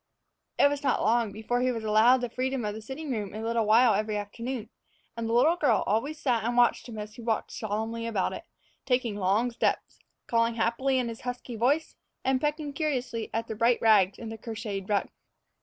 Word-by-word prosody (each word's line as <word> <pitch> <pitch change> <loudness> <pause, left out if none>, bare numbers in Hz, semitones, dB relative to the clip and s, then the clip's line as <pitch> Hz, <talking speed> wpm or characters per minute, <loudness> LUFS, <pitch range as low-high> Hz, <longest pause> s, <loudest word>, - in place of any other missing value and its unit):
It - - +6
was 285 0 -2
not 275 -4 +1
long 230 -2 +2
before 220 +4 -2
he 255 0 +2
was 225 -2 -4
allowed 220 +4 +5
the 245 - -2
freedom 255 -1 -2
of 210 - -2
the 220 - -7
sitting 275 +6 -6
room 210 -4 -3
a 220 - -5
little 230 -1 0
while 225 +1 +6
every 210 +1 -1
afternoon, 230 +3 -5 0.4
and 230 -1 -3
the - - 0
little 295 +9 +4
girl 300 - +2
always 275 +9 0
sat 240 -6 +1
and 240 +2 -1
watched 240 0 +3
him 220 - -7
as 210 0 -6
he 235 - -11
walked 225 -1 -1
solemnly 225 +2 -3
about 210 -5 -1
it, - - -8 0.4
taking 250 -4 0
long 205 +5 +1
steps, 235 - -1 0.3
calling 230 0 +1
happily 250 +4 +1
in 250 -2 0
his 230 -1 -7
husky 245 -1 -5
voice, 275 +8 +1 0.3
and 260 0 +2
pecking 295 -1 -2
curiously 260 -7 -2
at 225 +1 -2
the - - -4
bright 230 +2 +2
rags 205 -4 +4
in 225 - -7
the 225 0 -7
crocheted 215 -4 -5
rug. 205 -1 +1
230 Hz, 205 wpm, -28 LUFS, 220-255 Hz, 0.4 s, It